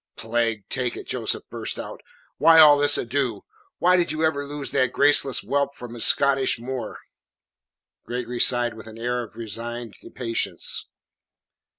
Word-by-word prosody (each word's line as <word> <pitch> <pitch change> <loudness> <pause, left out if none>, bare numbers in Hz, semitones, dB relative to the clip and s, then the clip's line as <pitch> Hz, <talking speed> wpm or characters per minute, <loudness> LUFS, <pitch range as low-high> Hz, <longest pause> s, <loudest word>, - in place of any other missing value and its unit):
"Plague 115 -2 -2
take 125 -2 -2
it," - - -8
Joseph - - -3
burst - - -4
out. - - -8 0.4
"Why 165 -1 +6
all 150 -2 +9
this 145 0 +4
ado? 120 -4 -2 0.3
Why 180 +1 +3
did 175 -2 0
you 155 +1 0
ever 145 -2 -1
loose 145 -1 -4
that 130 -2 +1
graceless 140 -2 +4
whelp 140 0 -1
from 120 -1 -9
his 120 - +1
Scottish 135 -2 +2
moor?" 125 +2 -6 1.1
Gregory 120 0 -4
sighed 120 -1 +2
with 110 0 -12
an 110 0 -11
air 120 +1 -2
of 115 -3 -10
resigned 115 +1 -6 0.2
patience. 115 -2 -1
125 Hz, 155 wpm, -23 LUFS, 115-140 Hz, 1.1 s, all